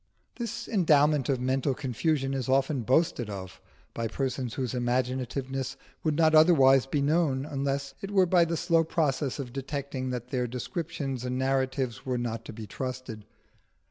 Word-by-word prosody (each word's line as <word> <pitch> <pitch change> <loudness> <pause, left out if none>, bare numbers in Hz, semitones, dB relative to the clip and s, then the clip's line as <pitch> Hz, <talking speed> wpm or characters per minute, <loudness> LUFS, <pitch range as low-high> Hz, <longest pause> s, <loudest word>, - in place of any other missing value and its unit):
This 235 -1 -4
endowment 150 - +3
of 135 -2 +1
mental 130 +1 0
confusion 135 +2 -1
is 130 -2 -2
often 135 +1 +2
boasted 130 -1 +1
of 95 -2 -7 0.3
by 115 -1 -2
persons 130 0 -3
whose 130 -3 -2
imaginativeness 130 +1 -2 0.3
would 155 -2 +1
not 160 0 +4
otherwise 135 -5 +6
be 140 +1 0
known, 145 -3 +1
unless 140 -1 -2
it 195 - -5
were 195 -2 +4
by 175 -1 +4
the 165 0 -2
slow 165 0 +3
process 145 -4 0
of 130 -4 -6
detecting 135 -1 -4
that 125 -1 -4
their 125 -2 -1
descriptions 135 +1 -4
and 125 0 -2
narratives 130 -2 -1
were 130 -1 -1
not 115 -1 -3
to - - -7
be 110 0 -8
trusted. 125 -1 -6
135 Hz, 160 wpm, -28 LUFS, 125-150 Hz, 0.3 s, otherwise